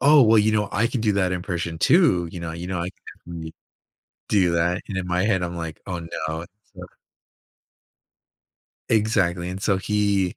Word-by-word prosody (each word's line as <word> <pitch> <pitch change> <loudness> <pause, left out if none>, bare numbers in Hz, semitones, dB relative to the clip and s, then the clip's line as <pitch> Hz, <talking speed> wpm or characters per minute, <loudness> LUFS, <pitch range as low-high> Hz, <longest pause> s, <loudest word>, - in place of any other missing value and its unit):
"Oh, 145 +1 +7
well, 110 -1 +5
you 105 +1 +4
know, 105 -1 +1
I 105 +4 +2
can 125 - -2
do 105 -2 +2
that 95 -2 +1
impression 85 -3 -3
too. 130 - +4
You 90 - -6
know 85 -1 -4
you 85 +2 -6
know, 90 -2 -2
I 85 - -2
can - - -35 0.3
definitely 80 -2 -7 0.8
do 95 -4 +3
that." 85 +2 +1
And 95 - -3
in 90 - -3
my 90 +1 +1
head, 100 -4 +2
I'm 85 0 -4
like, 80 -2 -6
"Oh, 90 -2 -3
no," 80 0 -4 0.3
so - - -8 2.0
Exactly 95 -6 +1
and 95 +2 -5
so 100 -2 +2
he 100 -3 0
90 Hz, 185 wpm, -23 LUFS, 85-105 Hz, 2.0 s, Oh